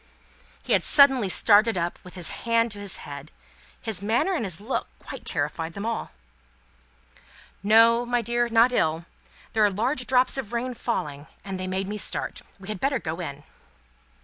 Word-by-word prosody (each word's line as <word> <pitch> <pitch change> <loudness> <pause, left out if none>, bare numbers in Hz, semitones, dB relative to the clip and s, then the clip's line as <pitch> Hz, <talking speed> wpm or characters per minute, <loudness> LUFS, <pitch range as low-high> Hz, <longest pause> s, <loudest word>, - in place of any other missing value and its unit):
He - - 0
had - - +3
suddenly 270 -8 +5
started 215 +2 +4
up, 170 0 -2
with 180 - -12
his 175 -3 0 0.2
hand 230 0 +3
to 205 - -6
his 200 -1 -5
head. 140 +1 -8 0.5
His 220 -5 -2
manner 230 - +1
and 330 - -1
his 180 -4 -5
look 220 +6 -3
quite - - -10
terrified 165 0 -2
them 200 +4 -5
all. 230 0 -3 1.5
"No, 230 +3 +5
my 245 0 0
dear, 240 0 0
not 230 +2 +5
ill. 160 -7 0 0.5
There 220 -1 +3
are 205 - +5
large 245 +7 -1
drops 255 +1 +2
of 235 -3 -6
rain 250 +2 -2
falling, 150 -12 -4 0.2
and 190 -1 -5
they 185 - -3
made 190 +1 -2
me 210 +1 -4
start. - - -4 0.2
We 190 - -12
had 210 -3 -4
better 275 +4 +1
go 165 -6 -5
in." 145 -4 -6
215 Hz, 175 wpm, -25 LUFS, 185-240 Hz, 1.5 s, suddenly